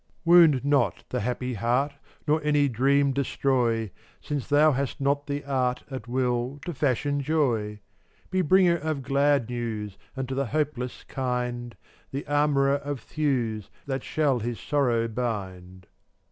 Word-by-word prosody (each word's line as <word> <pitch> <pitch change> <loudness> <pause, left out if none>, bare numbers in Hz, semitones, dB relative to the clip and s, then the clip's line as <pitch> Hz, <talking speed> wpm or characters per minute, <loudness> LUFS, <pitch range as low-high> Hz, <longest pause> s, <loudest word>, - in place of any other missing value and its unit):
433 - - -2
Wound 155 -7 +7
not 120 - +2
the - - -1
happy 125 +3 -2
heart 120 +6 +1
AtttAf - - -26 0.3
Nor 150 +1 +2
any 145 -1 +3
dream 140 +3 +2
destroy, 125 -4 +1
fV% 100 - -12 0.3
Since 145 -3 -3
thou 150 +1 +5
hast 140 0 -2
not 140 +1 0
the 145 0 -3
art, 130 -2 0
\Jv£' - - -4
At 125 -3 -7
will, 125 +2 -1
to 175 - -3
fashion 145 +1 0
joy. 130 -8 0
ffUtt<t 105 - -15 0.5
Be 185 0 +2
bringer 180 +1 +4
of 155 -3 -3
glad 140 -2 +2
news, 115 -4 -4 0.2
25 - - -21
And 130 -1 -3
to - - -2
the 135 +1 0
hopeless 130 -2 -2
kind 125 -2 -3 0.2
— - - -32
The 140 - -3
armorer 145 -1 +2
of 145 -1 -5
thews 120 -9 -1 0.2
That 135 -2 -3
shall 145 -5 +1
his 120 +1 -4
sorrow 120 -6 +1
bind. 95 -6 -5
135 Hz, 170 wpm, -26 LUFS, 120-145 Hz, 0.5 s, Wound